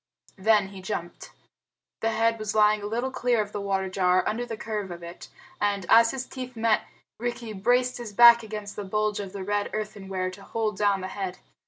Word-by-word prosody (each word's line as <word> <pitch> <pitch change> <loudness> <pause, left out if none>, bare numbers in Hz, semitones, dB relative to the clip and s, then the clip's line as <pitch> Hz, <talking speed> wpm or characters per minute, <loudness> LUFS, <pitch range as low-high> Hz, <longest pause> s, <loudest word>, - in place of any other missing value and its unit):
Then 210 -1 +3
he 195 -1 -10
jumped. 180 -3 -5 0.7
The 225 - 0
head 225 0 +1
was 215 0 -3
lying 210 0 +4
a 205 - -4
little 240 +5 -2
clear 245 -3 +1
of 210 -1 -1
the 205 - -4
water 195 -1 -1
jar, 185 -1 +2
under 240 +3 -2
the 225 - -5
curve 210 -3 -4
of 175 -1 -8
it; 170 +1 -9 0.3
and, 200 -2 0
as 230 0 +7
his 260 0 -4
teeth 255 -1 -8
met, 225 -1 +1 0.3
Rikki 235 -1 -4
braced 245 +5 +1
his 235 -3 -6
back 235 +2 +8
against 210 -2 -7
the 205 - -4
bulge 210 +1 -1
of 195 -2 -5
the 195 -1 -6
red 205 +1 -1
earthenware 195 -3 -3
to 195 - -12
hold 215 0 -2
down 200 -1 +2
the 185 - -4
head. 190 -2 -4
210 Hz, 205 wpm, -26 LUFS, 195-230 Hz, 0.7 s, back